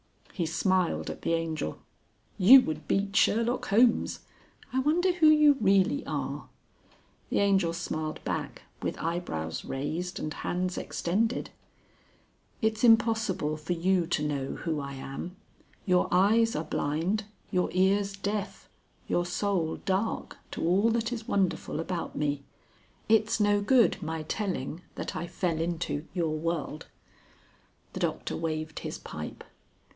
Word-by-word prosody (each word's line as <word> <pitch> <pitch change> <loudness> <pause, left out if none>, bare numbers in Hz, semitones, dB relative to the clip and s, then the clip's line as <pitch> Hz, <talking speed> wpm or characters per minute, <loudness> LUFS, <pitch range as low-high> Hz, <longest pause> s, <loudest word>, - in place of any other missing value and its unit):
He 170 -3 -1
smiled 180 +2 +1
at - - -9
the 165 - 0
Angel. 160 - -2 0.6
"You 250 +8 +10
would 155 -7 -4
beat 200 0 0
Sherlock 230 +3 +2
Holmes. 230 +4 +3 0.5
I 260 - +2
wonder 335 +7 +3
who 340 -3 +4
you 300 -2 +6
really 200 +7 +3
are." - - -3 0.8
The - - 0
Angel 195 -4 +3
smiled 155 -2 -3
back, - - -4 0.2
with - - -2
eyebrows 155 - -3
raised 160 +7 -3
and 155 - -3
hands 180 0 -2
extended. 220 +8 -1 1.1
"It's 220 0 +1
impossible 225 -9 +3
for 155 +3 -3
you 175 0 +1
to 150 -3 0
know 140 -2 -2
who 160 -3 -2
I 140 -1 -5
am. 135 +7 -6 0.5
Your 180 -2 +3
eyes 220 +5 +4
are 155 - -1
blind, 170 +9 -1 0.3
your 180 -3 +1
ears 195 +2 +2
deaf, 200 +1 -4 0.4
your 175 0 0
soul 180 -3 0
dark, 195 +4 -1
to - - -3
all 195 +6 +3
that 230 +1 0
is 225 -2 -6
wonderful 190 -5 0
about 170 +1 -4
me. 145 -1 -1 0.7
It's 215 0 +3
no 205 -1 +3
good 235 +3 +4
my 160 0 -3
telling 170 -3 -3
that - - -5
I 175 - -3
fell 170 -2 -1
into 165 -3 -2
your 165 -3 0
world." 155 -1 -3 1.1
The - - -5
Doctor - - -2
waved 155 -1 -3
his - - -5
pipe. - - -8
180 Hz, 135 wpm, -28 LUFS, 160-215 Hz, 1.1 s, You